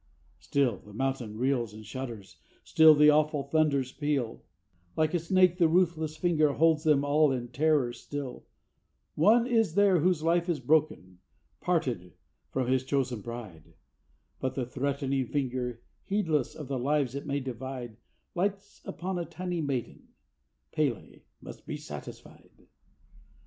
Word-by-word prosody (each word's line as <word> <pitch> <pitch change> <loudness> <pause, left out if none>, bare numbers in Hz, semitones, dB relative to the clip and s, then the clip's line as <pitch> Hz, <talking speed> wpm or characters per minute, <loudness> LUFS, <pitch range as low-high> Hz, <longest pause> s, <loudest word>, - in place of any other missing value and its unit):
Still 135 -7 0
the 105 - -16
mountain 130 -4 -2
reels 120 -4 0
and 110 0 -11
shudders, 115 -3 -7 0.3
still 160 -1 +6
the 150 +1 +7
awful 150 -1 +2
thunders 140 -3 +1
peal, 140 -6 -2 0.6
Like 155 +1 +1
a 175 - +2
snake 180 +1 +3
the 170 - +5
ruthless 160 -2 +1
finger 155 -5 +2
holds 160 0 +3
them 150 -3 +3
all 150 0 +3
in 120 -2 -3
terror 140 -2 +1
still; 140 +1 -7 0.7
One 220 +9 +4
is 225 -9 +1
there 200 -3 +4
whose 170 -1 +1
life 170 +2 +2
is 170 - 0
broken, 125 - 0 0.4
parted 125 - -1 0.4
from 130 -1 -1
his 130 0 +2
chosen 130 -4 -1
bride, 110 -9 -9 0.6
But 130 - -2
the 130 - -1
threatening 135 0 -2
finger, 125 -4 -3 0.2
heedless 165 - 0
of 150 - -8
the 135 -1 -2
lives 140 -1 0
it 140 +1 -6
may 140 0 -1
divide, 130 -3 -6 0.4
Lights 195 +2 -3
upon 185 0 -4
a 170 - -3
tiny 180 -1 -4
maiden, 135 -5 -4 0.7
P├®l├® 140 -9 -2 0.2
must - - -11
be - - -4
satisfied! 75 -1 -11
140 Hz, 140 wpm, -29 LUFS, 125-160 Hz, 0.7 s, the